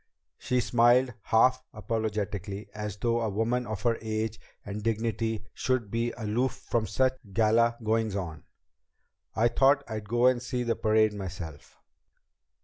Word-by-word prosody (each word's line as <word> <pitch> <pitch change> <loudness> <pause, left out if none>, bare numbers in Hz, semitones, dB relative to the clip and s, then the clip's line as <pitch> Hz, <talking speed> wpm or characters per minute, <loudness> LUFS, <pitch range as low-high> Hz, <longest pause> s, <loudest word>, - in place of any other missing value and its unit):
She 125 0 +1
smiled 120 +2 +4
half 130 +3 +4
apologetically, 105 -2 -3
as 105 -1 -5
though 115 +2 0
a 110 - 0
woman 115 +4 0
of 110 -2 -5
her 115 -2 +1
age 110 0 -2 0.3
and 105 +1 -5
dignity 115 0 -1
should 125 -6 -1
be 115 +1 0
aloof 115 +3 0
from 115 -2 -2
such 130 +6 +2 0.2
gala 115 +3 +3
goings 110 -1 0
on. 80 -6 -4 0.9
"I 115 +2 +4
thought 135 +4 +4
I'd 110 -2 -6
go 120 +2 +2
and 125 -1 +4
see 125 -1 -2
the 115 -1 0
parade 110 -1 +3
myself." 90 -6 -8
110 Hz, 140 wpm, -28 LUFS, 105-120 Hz, 0.9 s, smiled